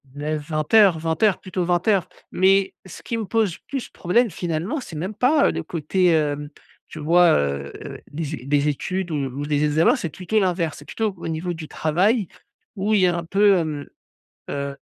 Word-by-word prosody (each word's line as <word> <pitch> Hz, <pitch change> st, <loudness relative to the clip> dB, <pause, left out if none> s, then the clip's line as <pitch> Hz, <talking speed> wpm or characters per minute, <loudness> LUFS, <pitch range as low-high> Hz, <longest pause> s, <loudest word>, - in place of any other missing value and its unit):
9-20:00, 155 Hz, +5 st, +2 dB
20:00, 165 Hz, +5 st, +1 dB
plutôt, 185 Hz, -1 st, -3 dB
20:00. 180 Hz, +2 st, +2 dB, 0.2 s
Mais 195 Hz, +1 st, +3 dB
ce 185 Hz, -, -11 dB
qui 230 Hz, -, -3 dB
me 225 Hz, -, -2 dB
pose 215 Hz, -4 st, 0 dB
plus 270 Hz, -3 st, -4 dB
problème 230 Hz, +7 st, +1 dB
finalement, 175 Hz, -, -3 dB
c'est 165 Hz, -, -9 dB
même 185 Hz, +7 st, -3 dB
pas 280 Hz, +6 st, +3 dB
le -, -, -3 dB
côté, 170 Hz, +2 st, +1 dB
heu, 145 Hz, -1 st, 0 dB, 0.4 s
tu 155 Hz, -, -9 dB
vois, 170 Hz, +2 st, +5 dB
heu, 70 Hz, 0 st, -2 dB, 0.4 s
des 155 Hz, 0 st, -4 dB
é 125 Hz, -, -12 dB
des 145 Hz, +1 st, +2 dB
études 180 Hz, +4 st, -2 dB
ou 140 Hz, -1 st, -3 dB
des 150 Hz, 0 st, +1 dB
examens, 150 Hz, +2 st, +3 dB
c'est 170 Hz, -, -4 dB
plutôt 190 Hz, +7 st, -1 dB
l'inverse, 175 Hz, -4 st, 0 dB
c'est -, -, -13 dB
plutôt 220 Hz, -3 st, -2 dB
au 170 Hz, -, -6 dB
niveau 165 Hz, +2 st, -3 dB
du 160 Hz, -2 st, -8 dB
travail 190 Hz, +6 st, +1 dB, 0.5 s
où 205 Hz, +2 st, 0 dB
il 200 Hz, -, +4 dB
y 180 Hz, -, +5 dB
a 175 Hz, -, +1 dB
un 170 Hz, -, -3 dB
peu, 200 Hz, +3 st, +4 dB
hem 155 Hz, -4 st, -3 dB, 0.6 s
heu, 140 Hz, 0 st, -4 dB
170 Hz, 180 wpm, -22 LUFS, 150-195 Hz, 0.6 s, vois